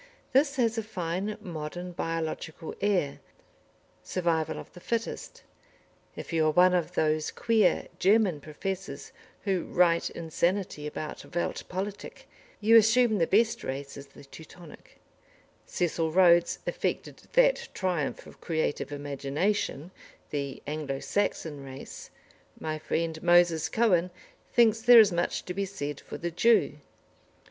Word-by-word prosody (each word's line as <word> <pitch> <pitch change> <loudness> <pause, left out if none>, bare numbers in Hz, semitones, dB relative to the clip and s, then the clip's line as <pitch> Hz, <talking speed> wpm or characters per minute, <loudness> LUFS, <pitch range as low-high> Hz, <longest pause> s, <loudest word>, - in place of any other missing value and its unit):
This 280 +1 +3
has 230 -3 +1
a - - -1
fine, 195 0 -3
modern, 175 -1 -6
biological 165 -1 -4
air 185 -9 0 0.8
("Survival 165 -3 -1
of - - -10
the 180 - -11
Fittest"). 230 +5 -4 0.7
If - - -8
you 160 -1 +3
are - - +3
one 180 +3 +5
of 175 -2 -1
those 155 0 +1
queer 230 -2 +2
German 195 -5 +3
professors 155 0 -6 0.3
who 190 -4 0
write 170 -1 +2
insanity 170 -1 -2
about 155 +2 -7
Welt 175 - -2
Politik, 195 +2 -6 0.3
you 225 +2 +6
assume 225 0 +4
the 165 - +2
best 225 +3 +2
race 140 +1 -5
is 140 0 -10
the 140 - -16
"Teutonic"; 160 +3 -14 0.7
Cecil 165 -2 -1
Rhodes 175 -1 +5
affected - - -3 0.2
that - - +3
triumph 180 -7 -2
of - - -15
creative 160 -4 -2
imagination, 145 +5 -2 0.4
the 140 -2 -4
"Anglo 145 -2 -3
Saxon 160 -7 -2
race"; 135 0 -9 0.5
my 155 0 -3
friend, 160 0 -2
Moses 175 -2 +4
Cohen, 185 -6 +2 0.4
thinks 225 -2 +4
there 245 0 +9
is 210 -3 +6
much 175 0 -1
to 180 - -4
be 200 +1 -1
said 145 -7 -5
for - - -8
the 170 0 -4
Jew. 230 +7 +3
175 Hz, 130 wpm, -28 LUFS, 155-205 Hz, 0.8 s, there